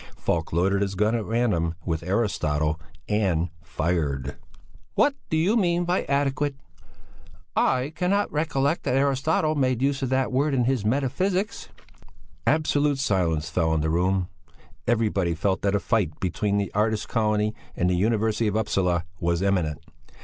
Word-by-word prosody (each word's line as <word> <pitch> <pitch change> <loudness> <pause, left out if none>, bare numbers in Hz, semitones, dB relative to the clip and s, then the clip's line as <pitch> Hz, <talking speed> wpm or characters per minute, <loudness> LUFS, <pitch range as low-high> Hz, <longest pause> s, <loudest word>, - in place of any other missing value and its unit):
Falk 80 -2 -1
loaded 95 +4 +2
his 100 -1 -1
gun 105 +3 +2
at 115 -2 0
random 105 -8 0
with 80 -2 -1
Aristotle 80 -6 0 0.3
and 95 -6 +1
fired. 75 -5 -2 0.6
"What 290 - +4 0.2
do 160 - +1
you 180 +8 +2
mean 175 -5 +2
by 180 +2 0
adequate? 140 0 0 1.0
I 130 +3 +1
cannot 200 +3 +1
recollect 150 0 0
that 125 - 0
Aristotle 140 +3 +2
made 130 -5 +1
use 140 0 +1
of 130 - -1
that 130 0 +1
word 140 +2 +1
in 125 - +2
his 125 -3 +1
Metaphysics." 180 - -1 0.8
Absolute 150 -2 +2
silence 90 - 0
fell 85 -3 +1
on 80 -1 +1
the 80 +1 0
room; 90 +2 +1 0.6
everybody 105 -7 +1
felt 95 +4 0
that 100 0 +1
a - - +2
fight 100 -11 0
between 100 +3 0
the 100 -1 -1
artist's 105 +1 +1
colony 105 -1 +1 0.2
and 90 - +1
the 90 - +2
University 110 +3 +1
of 105 - -1
Upsala 90 -6 0
was 85 +1 0
imminent. 80 -7 0
105 Hz, 150 wpm, -25 LUFS, 90-135 Hz, 1.0 s, What